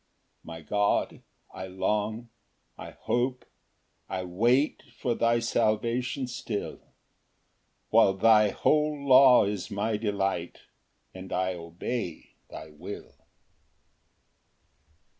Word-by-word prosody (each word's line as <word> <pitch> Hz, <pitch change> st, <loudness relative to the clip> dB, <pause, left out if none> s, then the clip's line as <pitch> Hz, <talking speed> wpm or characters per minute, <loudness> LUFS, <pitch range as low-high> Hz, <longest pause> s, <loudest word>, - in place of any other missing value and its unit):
6 -, -, -31 dB
My 80 Hz, -1 st, -8 dB
God, 105 Hz, +6 st, 0 dB, 0.3 s
I 95 Hz, -, -7 dB
long, 105 Hz, +5 st, -2 dB, 0.5 s
I -, -, -9 dB
hope, 125 Hz, +1 st, -2 dB, 0.6 s
I 95 Hz, -, -3 dB
wait 120 Hz, -, +1 dB, 0.2 s
For 120 Hz, -, -1 dB
thy 115 Hz, 0 st, +2 dB
salvation 115 Hz, +3 st, 0 dB
still; 115 Hz, -4 st, -5 dB, 1.1 s
While 95 Hz, -, +5 dB
thy 105 Hz, +1 st, +5 dB
whole 150 Hz, +8 st, +1 dB
law 130 Hz, -3 st, +7 dB
is 100 Hz, -2 st, -4 dB
my 105 Hz, +2 st, -1 dB
delight, 100 Hz, -5 st, -2 dB, 0.5 s
And 95 Hz, 0 st, -10 dB
I 95 Hz, 0 st, 0 dB
obey 85 Hz, +3 st, -6 dB, 0.2 s
thy 80 Hz, -, -10 dB
will. 75 Hz, -, -9 dB
105 Hz, 100 wpm, -27 LUFS, 95-120 Hz, 1.1 s, law